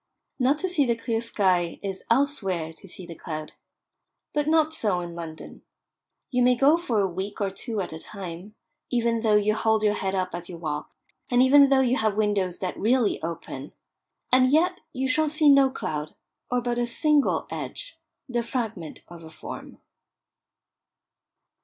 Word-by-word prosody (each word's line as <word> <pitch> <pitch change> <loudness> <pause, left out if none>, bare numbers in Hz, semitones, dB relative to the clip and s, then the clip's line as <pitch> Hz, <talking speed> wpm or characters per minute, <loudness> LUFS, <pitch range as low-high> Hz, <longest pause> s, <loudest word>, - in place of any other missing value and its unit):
Not 265 +3 +3
to 375 - -2
see 305 -7 +1
the 235 - +2
clear 230 0 -2
sky 185 -7 +1
is, 195 -1 -4
elsewhere, 200 - 0
to 195 - -15
see 180 0 -9
the 170 - -8
cloud. 155 -1 -6 0.8
But 295 0 0
not 315 0 +3
so 205 - +1
in 175 -1 -6
London. 165 -2 -9 0.7
You 250 -1 +2
may 250 0 +5
go 275 +5 +5
for 235 -11 0
a 195 - +2
week 190 +3 -5
or 200 -2 0
two 220 +1 -4
at 180 - -5
a 160 - -7
time, 190 +2 -8 0.3
even 235 -2 +1
though 220 -2 +3
you 210 +1 +3
hold 220 0 +1
your 210 -1 +3
head 195 -2 -2
up 185 -1 -1
as 175 0 -6
you 175 - -7
walk, 150 -2 -4 0.4
and 245 0 +5
even 280 +1 +7
though 270 -1 +5
you 255 0 +2
have 215 -2 0
windows 200 -4 +1
that 185 -1 -4
really 235 0 +2
open, 160 -4 -6 0.6
and 255 0 +5
yet 355 +5 +3
you 265 -2 -2
shall 305 +4 +2
see 300 0 +4
no 275 -1 +6
cloud, 155 - -5 0.3
or 245 0 +1
but 240 0 -1
a 240 - 0
single 295 +4 +2
edge, - - -6 0.3
the 240 -2 -1
fragment 225 - -4
of 170 -1 -12
a 160 - -10
form. 160 - -9
220 Hz, 180 wpm, -25 LUFS, 180-260 Hz, 0.8 s, even